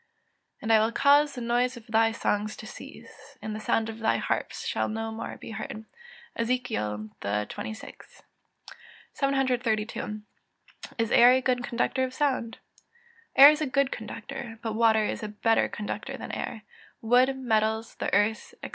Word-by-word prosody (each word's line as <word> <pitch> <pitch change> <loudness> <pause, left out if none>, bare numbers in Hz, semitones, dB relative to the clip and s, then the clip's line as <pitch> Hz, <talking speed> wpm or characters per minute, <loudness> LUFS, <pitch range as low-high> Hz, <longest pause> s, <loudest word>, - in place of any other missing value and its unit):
[Verse: - - -46
"And 225 - +2
I 220 - +7
will 220 +2 +2
cause 285 +4 +4
the 250 - -5
noise 240 +2 0
of 230 - -12
thy 225 -1 +3
songs 215 -1 -1
to - - -9
cease; 215 - -12
and 215 - -5
the - - -5
sound 220 +1 0
of 225 0 -7
thy 225 - +2
harps - - -3
shall - - -1
no 225 +1 -3
more 225 +1 -6
be - - -9
heard." 220 0 -6 0.5
EZEKIEL 225 - -2
XXVI.] 105 - -4 1.1
732. 245 -6 -1 0.7
Is 225 -2 0
air 245 +1 +7
a 260 - +4
good 250 -1 0
conductor 245 +2 0
of 255 0 -3
sound? 260 -6 -1 0.8
Air 280 +2 +11
is 305 0 -2
a 305 - 0
good 275 0 +1
conductor, 230 +2 -7
but 225 -2 -2
water 220 -1 +3
is - - -3
a 215 - -4
better 220 +2 +1
conductor 210 - -5
than - - -7
air; 220 - -5 0.4
wood, 250 +4 +4
metals, 220 -3 0
the - - -2
earth, 205 +3 +1
&c. - - -5
225 Hz, 165 wpm, -27 LUFS, 220-255 Hz, 1.1 s, Air